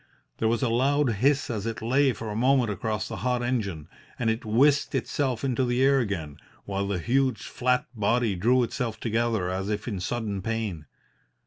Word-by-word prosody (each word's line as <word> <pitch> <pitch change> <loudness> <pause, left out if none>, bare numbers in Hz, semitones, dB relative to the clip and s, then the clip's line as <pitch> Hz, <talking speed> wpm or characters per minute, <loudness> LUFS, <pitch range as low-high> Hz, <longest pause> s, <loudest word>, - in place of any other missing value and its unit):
There 110 - +2
was 115 +1 +1
a 125 - +2
loud 135 +3 +2
hiss 135 +7 +2
as 110 -1 -3
it 115 - -3
lay 130 +4 +3
for 115 -2 -6
a - - -4
moment 125 -1 +3
across 105 +2 -2
the - - -6
hot 125 -1 0
engine, 100 - -2 0.3
and 115 -2 +1
it 110 - -3
whisked 135 +7 +3
itself 130 -1 -1
into 130 -1 +1
the 125 +1 +1
air 135 0 +5
again, 85 - -3 0.3
while 100 0 -2
the 100 -2 -1
huge 130 +8 +1
flat 125 0 0
body 115 0 +1
drew 120 +7 +3
itself 120 -1 -3
together 115 -5 0
as 95 +2 -3
if 105 +1 -3
in 100 -6 -3
sudden 105 0 -3
pain. 105 -8 -3
115 Hz, 190 wpm, -26 LUFS, 105-125 Hz, 0.3 s, air